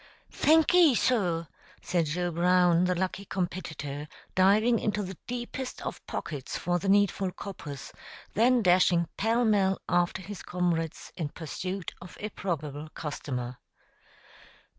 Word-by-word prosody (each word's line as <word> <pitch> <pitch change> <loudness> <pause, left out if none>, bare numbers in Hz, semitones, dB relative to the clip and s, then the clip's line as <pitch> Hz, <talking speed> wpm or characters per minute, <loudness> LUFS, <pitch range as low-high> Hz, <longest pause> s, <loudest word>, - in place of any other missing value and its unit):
"Thankee, 320 -1 +5
sur," 180 -10 +1 0.4
said 175 -3 +1
Joe 175 +4 -1
Brown, 175 0 +4
the 180 0 +1
lucky 190 +2 -2
competitor, 160 -6 -4 0.3
diving 210 +5 +4
into 210 -1 -1
the 190 0 -6
deepest 245 +1 -5
of - - -5
pockets 145 -5 -4
for 175 +1 0
the 195 - -2
needful 195 -1 +3
coppers, 150 -9 -8 0.4
then 240 +2 +4
dashing 175 -2 +4
pell 230 +3 +2
mell 195 -3 +3
after 175 +1 +1
his 205 0 -7
comrades 170 -3 -2
in 160 -5 -3
pursuit 185 +5 -5
of 180 - -11
a 210 - -3
probable 155 -6 -4
customer. 125 -5 -4
180 Hz, 125 wpm, -29 LUFS, 165-205 Hz, 0.4 s, Thankee